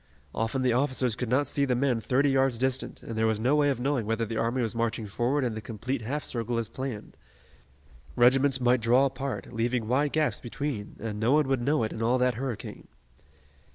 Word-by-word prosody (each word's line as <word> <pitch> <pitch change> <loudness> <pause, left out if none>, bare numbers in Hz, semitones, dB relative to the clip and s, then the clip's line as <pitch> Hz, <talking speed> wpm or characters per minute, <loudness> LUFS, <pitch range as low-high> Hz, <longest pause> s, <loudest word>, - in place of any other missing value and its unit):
Often 115 +4 -1
the 125 -2 +3
officers 130 -2 +1
could 125 -1 -4
not 130 +4 +2
see 140 - 0
the 130 -3 +1
men 125 -2 +1
thirty 135 +6 +2
yards 135 -2 +2
distant, 130 +1 -2
and - - -8
there 110 0 +2
was 110 -1 0
no 130 +6 +2
way 145 -1 +3
of 135 -4 -1
knowing 130 -4 -1
whether 115 +1 0
the 115 +1 -5
army 120 +3 0
was 115 - -2
marching 115 -1 -1
forward 125 +7 0
in 120 -3 -1
the 110 - -5
complete 115 +4 -4
half 140 +7 -3
circle 120 0 -3
as 115 -1 -1
planned. 130 -3 -6 1.0
Regiments 130 +2 +4
might 125 0 +3
draw 125 +4 +4
apart, 135 -1 -4
leaving 115 0 -1
wide 140 +4 +1
gaps 155 -1 +1
between, 120 -3 -5
and 105 -2 -4
no 115 +5 +2
one 150 -2 +3
would 135 -2 0
know 145 +2 +1
it 110 - -2
in 110 - -6
all 120 +3 +2
that 125 0 +2
hurricane. 125 -1 -6
125 Hz, 215 wpm, -28 LUFS, 115-135 Hz, 1.0 s, Regiments